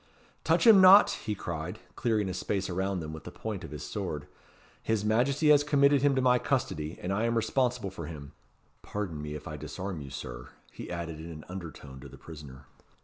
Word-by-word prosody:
"Touch - - +2
him 215 -4 +9
not!" 190 +2 +9
he 105 - -4
cried, 85 -2 -5 0.2
clearing 110 -4 0
a 95 - -3
space 95 0 -2
around 95 0 -1
them 80 0 -6
with 80 - -9
the - - -7
point - - -6
of - - -7
his - - -7
sword. 75 -1 -4 0.6
"His 110 -2 -1
Majesty 135 +8 +2
has 145 -1 +6
committed 140 -1 +4
him 140 -1 +3
to 130 - +1
my 125 -1 +4
custody, 80 - -2
and 90 +2 -3
I 105 +4 0
am 115 0 +1
responsible 120 -2 0
for 85 -5 -7
him. 70 -4 -9 0.5
Pardon 95 -8 -4
me 75 0 -5
if 75 - -8
I 75 - -6
disarm 80 +4 -6
you, 70 - -8
Sir," - - -7 0.2
he - - -9
added 85 -2 -5
in 80 +1 -8
an 75 -2 -9
undertone 80 -7 -8
to 70 +1 -11
the - - -13
prisoner. 70 -5 -11
95 Hz, 205 wpm, -29 LUFS, 75-120 Hz, 0.6 s, him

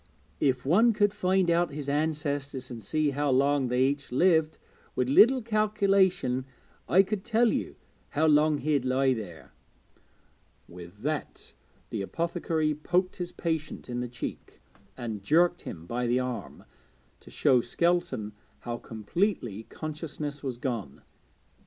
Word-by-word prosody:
If 130 -2 +1
one 220 - +5
could 205 -1 +2
find 190 -2 +1
out 170 +1 +2
his 145 -1 -6
ancestors 145 -3 -2
and 115 -2 -7
see 150 +8 0
how 145 +1 -1
long 135 +1 +3
they 125 +1 +2
each 140 0 -1
lived, 160 +2 +3 0.4
with 125 0 0
a - - 0
little 245 - +6
calculation 200 - +2 0.4
I 190 +2 +6
could 200 0 -3
tell 235 0 +2
you - - -3 0.3
how 155 +2 +1
long 150 0 +4
he'd 145 -3 0
lie 130 +1 +2
there.' 100 -9 -8 1.2
With 90 +4 -12
that 150 +1 -4 0.4
the - - -2
apothecary 165 - -1
poked 180 +5 0
his 175 -1 -4
patient 160 -6 -4
in 120 0 -3
the 125 - -2
cheek, 120 0 -7 0.4
and 110 -4 -5
jerked 175 - +3
him 85 -1 -8
by 120 +6 -2
the 120 +2 +2
arm, 125 -2 -5 0.6
to - - -16
show 125 -2 +3
Skelton 135 -5 0 0.3
how 120 -1 -4
completely 115 - -2
consciousness 150 -2 -5
was 130 -4 -4
gone. 115 - -4
145 Hz, 140 wpm, -28 LUFS, 125-175 Hz, 1.2 s, little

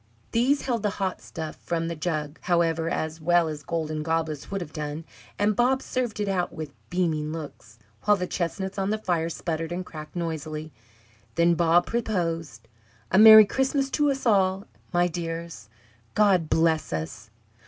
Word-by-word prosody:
These 265 +5 +2
held 240 -4 -1
the 210 - +1
hot 190 -2 -2
stuff 160 -1 -7
from 165 -1 -2
the 170 - -3
jug, 155 -2 -3
however, 165 -2 +1
as 160 0 -3
well 175 +1 +3
as 155 -1 -5
golden 155 0 -3
goblets 160 -2 -2
would 195 - -2
have 170 -4 -7
done; 150 0 -5 0.3
and 205 0 +2
Bob 260 +3 +2
served 245 -5 -2
it 205 - -1
out 185 -2 0
with 155 -4 -7 0.2
beaming 160 -4 0
looks, 145 -8 -8 0.3
while 210 -1 +5
the 180 - -2
chestnuts 190 +3 -3
on 195 0 0
the 215 - +1
fire 175 -6 -1
sputtered 165 -1 -3
and 180 +1 -3
cracked 155 -1 -10
noisily. 155 -2 -4 0.6
Then 170 +1 +4
Bob 170 +1 +3
proposed: 165 - -2 0.4
"A 190 - +5
Merry 220 0 +11
Christmas 270 +4 0
to 295 -1 +2
us 270 -1 -2
all, 195 -3 +2 0.3
my 175 0 +3
dears. 165 -8 -6 0.5
God 190 -7 +3
bless 160 -1 +2
us!" 80 +8 -5
170 Hz, 165 wpm, -26 LUFS, 155-195 Hz, 0.6 s, Merry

